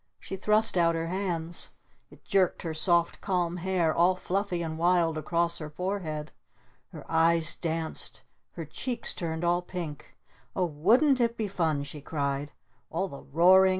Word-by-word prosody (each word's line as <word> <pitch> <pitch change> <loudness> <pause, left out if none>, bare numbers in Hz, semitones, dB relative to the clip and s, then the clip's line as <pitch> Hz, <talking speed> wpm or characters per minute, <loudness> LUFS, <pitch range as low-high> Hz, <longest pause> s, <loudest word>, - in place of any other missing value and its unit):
She - - -6
thrust 215 +1 +2
out 170 -1 +4
her 165 0 -2
hands. 175 -3 -2 0.4
It - - -18
jerked 190 -2 +2
her 165 -2 -3
soft, 170 +1 +2
calm 180 -2 0
hair 175 -3 +1
all 175 +2 +4
fluffy 185 -1 -1
and 160 -1 -3
wild 170 -1 +3
across 170 +2 0
her 155 -2 -6
forehead. 155 -3 -3 0.6
Her - - -11
eyes 165 0 +3
danced! 165 -1 -3 0.3
Her 165 - -6
cheeks 240 - -4
turned 160 -1 -3
all 175 +1 +2
pink! 175 -5 -7 0.4
"Oh 185 - +2
wouldn't 235 - +3
it 235 0 +1
be 220 - -1
fun?" 160 -7 0
she 145 +1 -8
cried. 140 -1 -2 0.4
"All 185 +4 -1
the 140 - -9
roaring! 185 +5 +6
170 Hz, 155 wpm, -28 LUFS, 160-185 Hz, 0.6 s, roaring